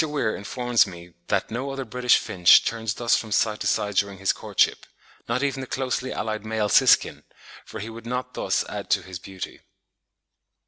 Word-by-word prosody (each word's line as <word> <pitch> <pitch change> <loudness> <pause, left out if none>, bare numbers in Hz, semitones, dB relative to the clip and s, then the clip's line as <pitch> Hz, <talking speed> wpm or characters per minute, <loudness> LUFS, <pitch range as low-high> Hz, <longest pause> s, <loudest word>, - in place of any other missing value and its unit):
Weir 145 -8 -1
informs 120 +2 +1
me 85 -2 -11
that - - -1
no 125 +5 -3
other 135 -1 -4
British 125 +1 +3
finch 90 -3 +5
turns 110 -2 -2
thus 120 -1 +2
from 110 - -4
side 105 +1 +1
to - - -2
side 105 0 0
during 100 -1 +1
his 95 +1 +1
courtship, - - 0 0.4
not 125 +4 0
even 135 -1 -1
the 130 - -6
closely 130 0 -2
allied 110 -1 -3
male 110 -1 -1
siskin, - - +4 0.4
for - - -8
he 105 - -6
would 115 +1 -10
not 125 +1 -3
thus - - 0
add - - -6
to - - +2
his 95 -2 -8
beauty. 95 0 -8
110 Hz, 185 wpm, -24 LUFS, 100-125 Hz, 0.4 s, finch